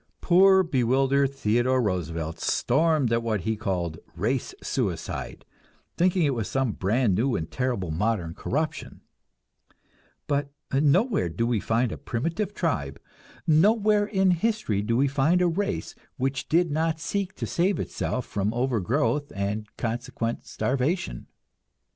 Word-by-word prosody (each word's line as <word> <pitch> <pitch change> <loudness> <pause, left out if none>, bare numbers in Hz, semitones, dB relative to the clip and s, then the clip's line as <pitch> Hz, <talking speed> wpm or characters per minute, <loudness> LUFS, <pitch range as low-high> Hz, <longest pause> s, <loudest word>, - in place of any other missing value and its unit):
Poor, 190 +2 +5
bewildered 135 -1 +2
Theodore 125 0 +1
Roosevelt 85 -6 -2
stormed 145 -2 +2
at 115 - +2
what 110 -4 -1
he 110 +3 -1
called 90 -7 -3 0.2
"race - - -1
suicide," - - -3 0.5
thinking 180 0 +2
it 145 -3 +2
was 115 -4 -2
some 135 -3 0
brand 105 +3 +1
new 120 +7 +1
and 80 0 -4
terrible 120 -10 -1
modern 90 -1 -1
corruption; 155 - -3 1.2
but 145 -1 -1 0.2
nowhere 150 - +3
do 115 +8 -1
we 120 -2 +1
find 115 +3 0
a - - -6
primitive 165 - -2
tribe, 70 - -2 0.5
nowhere 205 +5 +4
in 190 -3 +2
history 175 - 0
do 115 +3 0
we 140 +2 +3
find 145 +6 +2
a 180 - +3
race 200 +4 -2 0.2
which 135 +1 -2
did 170 0 +3
not 160 +1 0
seek 195 +3 -3
to - - -4
save 185 +3 +1
itself 125 - -3
from 100 +1 -1
overgrowth 130 +4 0
and 100 +2 -2
consequent 115 0 -3
starvation. 135 - -1
130 Hz, 135 wpm, -26 LUFS, 110-165 Hz, 1.2 s, Poor